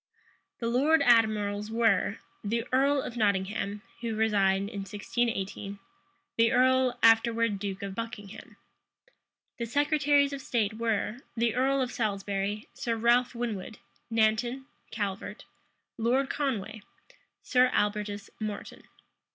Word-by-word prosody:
The 230 - -5
lord 280 +6 +3
admirals 215 -3 +3
were, 225 -2 +2 0.3
the 225 +3 -1
earl 275 +1 +3
of 245 - -6
Nottingham, 200 0 0 0.2
who 230 -2 -3
resigned 200 -3 +2
in 205 -1 -6
1618; 200 -1 -3 0.6
the 230 0 +4
earl, 255 0 +3
afterwards 225 -2 +4
duke 195 -1 -4
of 195 -1 -4
Buckingham. 225 -2 -8 1.0
The 235 - -2
secretaries 290 +1 +2
of 275 - -5
state 230 -7 0
were, 225 0 -1 0.2
the 230 -1 +2
earl 265 +2 +2
of 250 - -4
Salisbury, 205 -1 -2
Sir 230 -1 -2
Ralph 240 +2 +2
Winwood, 220 -3 -4 0.3
Nanton, 230 +4 +1 0.2
Calvert, 205 0 -4 0.5
Lord 255 +4 +1
Conway, 220 -7 -2 0.6
Sir 250 0 +4
Albertus 205 -1 -1
Moreton. 215 -2 -6
225 Hz, 115 wpm, -29 LUFS, 205-245 Hz, 1.0 s, the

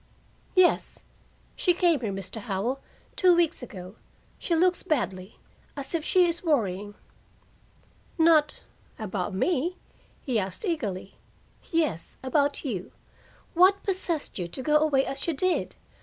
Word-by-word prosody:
"Yes. 370 -2 +3 0.5
She 355 -2 +2
came 345 -4 +3
here, 215 -4 -2
Mr. 195 +3 -5
Howell, 210 +7 -2 0.4
two 365 -2 +5
weeks 340 -3 +2
ago. 190 -4 -9 0.4
She 340 - 0
looks 355 +2 +3
badly 195 -10 -2 0.4
as 280 +3 -5
if 330 -2 0
she 365 +2 +4
is 340 0 -1
worrying." 205 - 0 1.2
"Not 320 -2 +4 0.3
about 200 -3 -3
me?" 345 - 0 0.5
he 250 -6 +1
asked 190 - -4
eagerly. 210 - -3 0.5
"Yes, 310 - -1
about 285 +3 +1
you. 195 -9 -4 0.6
What 370 +3 +5
possessed 350 - -2
you 175 - -2
to 175 - -5
go 300 +2 +4
away 295 -3 +2
as 275 +3 -2
you 330 - 0
did? 370 +5 0
285 Hz, 130 wpm, -27 LUFS, 205-340 Hz, 1.2 s, two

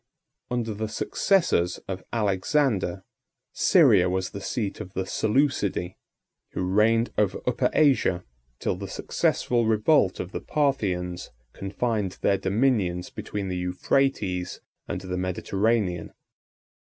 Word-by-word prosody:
] - - -56
Under 120 -3 -1
the 110 +1 -3
successors 110 - +1
of 95 -1 -5
Alexander, 100 -2 0 0.5
Syria 90 0 +5
was 95 0 -2
the 100 - -7
seat 105 -1 -3
of 95 -3 -9
the 95 - -1
Seleucidæ, 105 -5 0 0.6
who - - -2
reigned 110 +5 +3
over 100 -3 +1
Upper 125 0 +1
Asia, 135 - +3 0.3
till - - -1
the - - -6
successful 120 -2 0
revolt 110 - +3
of 90 - -5
the - - -5
Parthians 95 -12 -1 0.2
confined 100 0 -2
their 100 - +3
dominions 100 -3 0
between 100 -2 -5
the 90 -1 -3
Euphrates 90 +1 0 0.3
and - - -4
the 90 -1 -4
Mediterranean. 95 0 0
100 Hz, 120 wpm, -26 LUFS, 90-115 Hz, 0.6 s, Syria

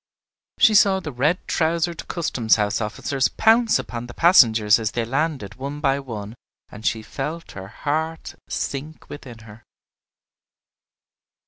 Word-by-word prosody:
She 220 - +5
saw 195 -2 +5
the 155 -5 -6
red 145 +8 0
trousered 165 0 -1
custom 130 -9 -4
house 105 +1 +3
officers 125 +5 -1
pounce 225 0 +3
upon 120 0 -6
the 120 - -11
passengers 115 - +5
as 110 -1 -3
they 115 -1 -1
landed 135 -5 -2
one 140 +4 -6
by 140 -2 +1
one, 110 -6 -7 0.4
and 105 - -12
she 110 0 -1
felt 155 +8 -6
her 95 0 -9
heart 160 +8 -3 0.2
sink 150 +3 -5
within 130 -5 -9
her. 110 +1 -14
135 Hz, 135 wpm, -22 LUFS, 115-160 Hz, 0.4 s, She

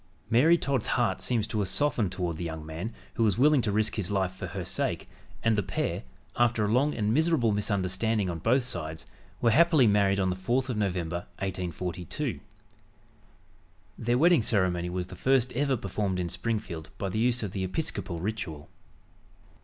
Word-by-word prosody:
Mary 155 +9 +6
Todd's 135 -7 -1
heart 120 -2 +1
seems 115 -4 0
to 110 -1 -3
have 100 - 0
softened 120 -4 +1
toward 90 -3 -2
the 85 - -5
young 80 -2 -5
man 80 +8 -5 0.2
who 115 - 0
was 105 -3 +2
willing 145 +1 +5
to 105 - -1
risk 110 +2 +1
his 100 -5 -2
life 95 -3 0
for 95 0 -7
her 90 0 -5
sake, - - -2 0.4
and 115 -1 +3
the 105 - +2
pair, - - -2 0.3
after 120 -3 +2
a 105 - 0
long 140 +5 +2
and 105 -1 +1
miserable 155 -6 +3
misunderstanding 100 +1 0
on 85 -2 -3
both 125 - +2
sides, 80 -10 -4 0.4
were 115 - +4
happily 160 -1 +5
married 100 -2 +3
on 95 -1 +1
the - - -2
4th 120 +8 0
of 120 - -2
November, 90 -4 -2
1842. 90 - -3 1.6
Their 120 +2 0
wedding 170 +1 +5
ceremony 90 -6 +1
was 90 0 -2
the 95 - -10
first 130 +4 +2
ever 135 0 +1
performed 100 -2 -2
in 90 -1 -2
Springfield 95 -4 -3
by 100 - -2
the 95 +3 -2
use 120 0 +1
of 100 - -3
the 95 -1 -3
Episcopal 95 - -3
ritual. 85 -6 -4
105 Hz, 180 wpm, -28 LUFS, 90-120 Hz, 1.6 s, Mary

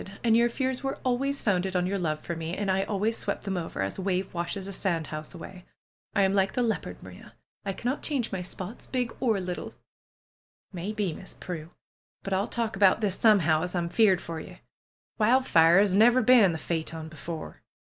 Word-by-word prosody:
And 225 -2 +4
your 235 +1 +4
fears 260 +1 -2
were 270 0 -2
always 275 +3 0
founded 190 -2 +1
on 180 0 +2
your 195 +2 -1
love 155 -3 -1
for 170 - -4
me, 165 +2 -4
and 200 -2 0
I 190 +1 +2
always 210 +3 0
swept - - -3
them 195 -1 -2
over, 165 - -3
as 95 - -4
a - - -2
wave 190 0 -1
washes 180 +3 -3
a 195 - -6
sand 170 -4 -1
house 155 +1 -7
away. 180 +1 -10 0.5
I 200 - +4
am 190 0 +2
like 195 -1 +2
the 250 - +1
leopard, 225 -2 -3
Maria; - - -13 0.3
I 195 - -1
cannot 250 +8 -2
change 270 -6 -1
my 190 - -3
spots, 185 +4 -7
big 250 -3 -2
or 225 -6 +1
little!^' 180 -1 -5 0.5
" - - -51
Maybe, 195 0 -2
Miss 185 - -8
Prue! 165 -3 -7 0.5
But 195 - -3
I'll 195 +3 +1
talk 230 -3 -2
about 195 +2 +4
this 200 -3 +2
some 215 -4 +5
how, 155 -1 +2
as 180 +1 -3
Pm 170 -1 -1
feared 195 -3 +4
for 165 -1 -6
ye. - - -11 0.6
Wildfire 210 -8 +5
'as 200 -1 +4
never 235 +5 +5
been 245 -2 +7
in 185 - +3
the 160 - -3
phaeton 160 0 -4
before." 160 +1 -8
195 Hz, 210 wpm, -27 LUFS, 175-225 Hz, 0.6 s, been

